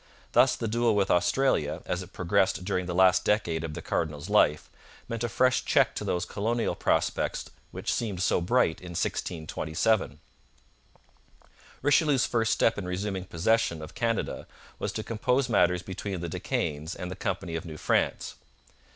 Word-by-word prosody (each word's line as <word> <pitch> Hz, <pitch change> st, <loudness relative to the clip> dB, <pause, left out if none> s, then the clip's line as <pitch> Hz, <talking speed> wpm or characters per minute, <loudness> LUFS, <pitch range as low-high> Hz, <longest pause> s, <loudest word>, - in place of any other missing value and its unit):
Thus -, -, +5 dB
the 115 Hz, -, -3 dB
duel 115 Hz, 0 st, +2 dB
with 100 Hz, -2 st, +2 dB
Austria, 90 Hz, -, +1 dB
as 90 Hz, -, -2 dB
it 90 Hz, 0 st, -10 dB
progressed 90 Hz, 0 st, +1 dB
during 90 Hz, -2 st, -1 dB
the 90 Hz, -, -3 dB
last 95 Hz, 0 st, +5 dB
decade 85 Hz, -6 st, +1 dB
of 80 Hz, -2 st, -5 dB
the -, -, -7 dB
cardinal's 80 Hz, +3 st, -2 dB
life, 75 Hz, -8 st, +3 dB, 0.4 s
meant 115 Hz, 0 st, -4 dB
a 120 Hz, -, -1 dB
fresh 130 Hz, +5 st, +2 dB
check -, -, +3 dB
to -, -, -4 dB
those 90 Hz, 0 st, -1 dB
colonial 115 Hz, +5 st, -1 dB
prospects -, -, -1 dB, 0.2 s
which -, -, -3 dB
seemed 105 Hz, -6 st, -2 dB
so 90 Hz, -, +2 dB
bright 90 Hz, -2 st, +2 dB
in 90 Hz, -1 st, -8 dB
1627. 85 Hz, +5 st, -1 dB, 1.6 s
Richelieu's 145 Hz, -2 st, +4 dB
first 115 Hz, -2 st, +1 dB
step 115 Hz, -, +2 dB
in 90 Hz, -, -5 dB
resuming 95 Hz, +1 st, -3 dB
possession 90 Hz, 0 st, +1 dB
of 80 Hz, -, -9 dB
Canada 115 Hz, -2 st, -2 dB, 0.3 s
was -, -, -2 dB
to -, -, -3 dB
compose 125 Hz, +4 st, 0 dB
matters 90 Hz, -6 st, +2 dB
between 95 Hz, 0 st, -5 dB
the 85 Hz, 0 st, -4 dB
De -, -, -5 dB
Caens 75 Hz, +3 st, -2 dB
and 90 Hz, 0 st, -6 dB
the -, -, -5 dB
Company 95 Hz, -4 st, -3 dB
of 80 Hz, -, -3 dB
New 80 Hz, -3 st, -8 dB
France. -, -, 0 dB
95 Hz, 165 wpm, -28 LUFS, 85-115 Hz, 1.6 s, Thus